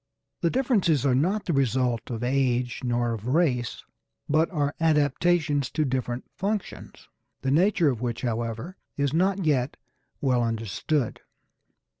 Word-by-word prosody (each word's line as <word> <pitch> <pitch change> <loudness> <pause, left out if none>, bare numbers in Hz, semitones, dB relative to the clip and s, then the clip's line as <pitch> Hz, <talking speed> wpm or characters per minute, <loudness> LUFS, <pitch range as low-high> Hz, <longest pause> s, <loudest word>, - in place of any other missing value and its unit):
The 170 - +2
differences 200 - +2
are 135 - +3
not 185 +11 +1
the 170 - 0
result 125 -3 +1
of 120 -1 -4
age 125 -1 0
nor 120 -1 0
of 110 +1 -6
race, 130 -5 +1 0.4
but 155 +2 +2
are 145 -4 -1
adaptations 150 -2 +2
to 155 - +1
different 125 -2 -2
functions, 205 +1 -4 0.4
the 135 - +1
nature 170 0 +3
of 120 -3 -5
which, 120 -1 -3
however, 115 - -3 0.2
is 140 -1 0
not 190 +2 +1
yet 135 -2 +1 0.4
well 125 -3 +2
understood. 115 - -1
135 Hz, 135 wpm, -26 LUFS, 120-165 Hz, 0.4 s, are